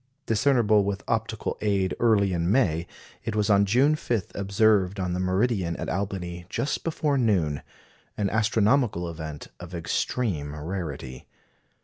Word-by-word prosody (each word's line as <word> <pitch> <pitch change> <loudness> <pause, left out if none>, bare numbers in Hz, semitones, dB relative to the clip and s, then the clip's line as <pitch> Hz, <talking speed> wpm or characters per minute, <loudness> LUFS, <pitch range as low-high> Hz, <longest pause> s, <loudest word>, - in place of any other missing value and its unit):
Discernible 110 -3 +3
with 100 -1 -3
optical - - -2
aid 100 -3 +1
early 105 -5 +3
in 85 +1 0
May, 85 -9 +2 0.4
it 110 - -3
was 105 0 +2
on 100 0 +5
June 130 +9 +3
5 115 - -2
observed 100 -1 +2
on 90 -1 -1
the 90 - -2
meridian 95 -1 +1
at - - -4
Albany 90 -2 -4
just 140 - -2
before 150 -4 0
noon 85 - +1 0.6
an 105 - +1
astronomical 110 -3 +2
event 80 -3 -7
of 90 0 -8
extreme 85 -3 -2
rarity. 75 -6 -6
100 Hz, 135 wpm, -26 LUFS, 85-110 Hz, 0.6 s, on